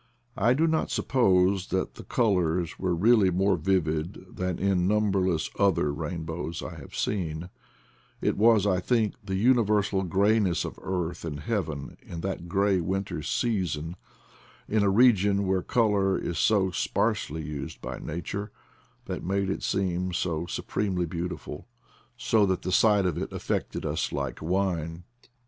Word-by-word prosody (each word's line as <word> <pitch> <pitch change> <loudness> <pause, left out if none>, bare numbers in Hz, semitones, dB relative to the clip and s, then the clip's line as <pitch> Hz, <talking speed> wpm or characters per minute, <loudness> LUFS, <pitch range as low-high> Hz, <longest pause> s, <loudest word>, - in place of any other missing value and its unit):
I 115 +5 +4
do 160 +4 +3
not 160 -1 +1
suppose 95 -6 +2
that 95 - -1
the - - -11
colors 90 -7 0
were 90 -2 0
really 105 +2 +5
more 95 +2 +2
vivid 85 0 -1
than 90 -1 -2
in 95 -2 +1
numberless 95 -5 +1
other 95 -7 +2
rainbows 80 +1 -4
I - - -6
have - - -11
seen; 85 -3 -2 0.7
it - - 0
was, 110 -1 +4
I 95 -3 +2
think, 110 +2 +1
the 95 -2 -3
universal 105 -3 +3
grayness 95 +1 +2
of - - -7
earth 90 -2 -3
and 75 -3 -5
heaven 80 -11 -3
in 85 - -8
that 95 -2 -4
gray 100 0 +2
winter 95 +3 -2
season, 85 -8 -1 0.7
in 110 0 +1
a 100 - +3
region 100 -3 +4
where 95 0 +1
color 100 -3 +2
is 85 -3 -3
so 100 -4 +3
sparsely 80 -2 -1
used 75 -1 -6
by - - -6
Nature, 100 +6 -5 0.5
that - - -5
made 95 +1 0
it - - -3
seem 90 -1 -1
so 85 -1 -1
supremely 95 -2 -2
beautiful, 85 -3 -5 0.5
so 110 -4 +3
that 95 -1 -1
the 90 - -2
sight 105 0 +4
of 90 -4 0
it - - -4
affected - - -3
us - - -1
like 70 -3 -3
wine. 85 -1 -1
95 Hz, 150 wpm, -27 LUFS, 85-100 Hz, 0.7 s, really